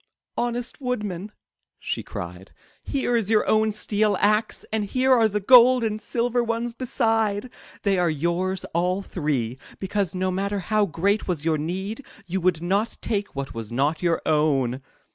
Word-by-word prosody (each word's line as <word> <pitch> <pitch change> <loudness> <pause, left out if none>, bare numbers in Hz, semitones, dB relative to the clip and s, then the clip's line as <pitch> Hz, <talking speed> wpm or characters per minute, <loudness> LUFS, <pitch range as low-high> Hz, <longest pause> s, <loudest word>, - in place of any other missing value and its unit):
'* - - -63
Honest 240 +2 -3
Woodman," 210 -6 -3 0.5
she - - -3
cried, 90 +3 -8 0.3
*'here 260 -3 -1
is 220 -4 +1
your 220 -1 +3
own 220 0 +3
steel 210 -1 0
axe, 210 +1 +1
and 215 -1 0
here 260 +5 +2
are 230 -3 +5
the 210 0 -1
gold 250 +3 +7
and 215 -1 -1
silver 240 0 0
ones 230 +1 -2
beside. 225 -3 0 0.3
These 195 -3 +2
are 175 -1 +2
yours 170 +5 -1
all 180 +3 0
three, 135 -9 -2 0.2
because, 195 -1 -2
no 185 0 0
matter 200 +2 -1
how 210 +2 +1
great 195 +6 0
was 165 -5 -2
your 160 -2 +2
need, 190 - -4 0.2
you 190 +1 -2
would 170 -2 +1
not 200 +6 0
take 205 -5 -2
what 140 0 -4
was 115 -1 -6
not 145 +6 0
your 170 -2 +1
own!" 140 -5 +1
200 Hz, 165 wpm, -24 LUFS, 170-225 Hz, 0.5 s, gold